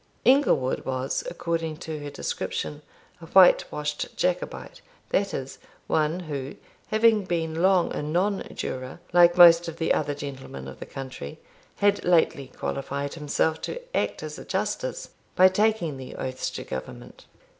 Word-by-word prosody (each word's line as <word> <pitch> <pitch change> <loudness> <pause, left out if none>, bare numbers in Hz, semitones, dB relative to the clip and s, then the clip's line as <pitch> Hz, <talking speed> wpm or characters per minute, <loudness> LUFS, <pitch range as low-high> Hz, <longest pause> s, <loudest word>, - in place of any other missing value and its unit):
Inglewood 255 - +3
was 130 +1 -2
according 165 -2 -3
to 160 -2 -6
her 145 0 -6
description 150 +1 -4 0.4
a 165 - -10
white 185 +1 +6
washed 150 0 -4
Jacobite; - - -2 0.3
that 195 0 +1
is, 135 0 -6 0.3
one 155 +3 0
who, 140 -5 -5 0.3
having 220 -1 +4
been 165 -3 -2
long 185 -1 +3
a - - -3
non 180 +7 0
juror, 130 +4 -5
like 175 0 +6
most 170 -1 +8
of 165 - -6
the 160 - +1
other 145 - -1
gentlemen 135 - -7
of 65 - -10
the - - -8
country, 130 - -8 0.4
had 205 0 +2
lately 160 -6 +2
qualified 140 +1 -3
himself 155 +1 0
to 485 - -4 0.2
act - - -1
as - - -6
a - - -8
justice, - - -3 0.3
by 185 - +8
taking 185 -6 +1
the 130 -1 -9
oaths 130 0 -3
to - - -6
Government. 65 - -8
160 Hz, 150 wpm, -26 LUFS, 140-185 Hz, 0.4 s, most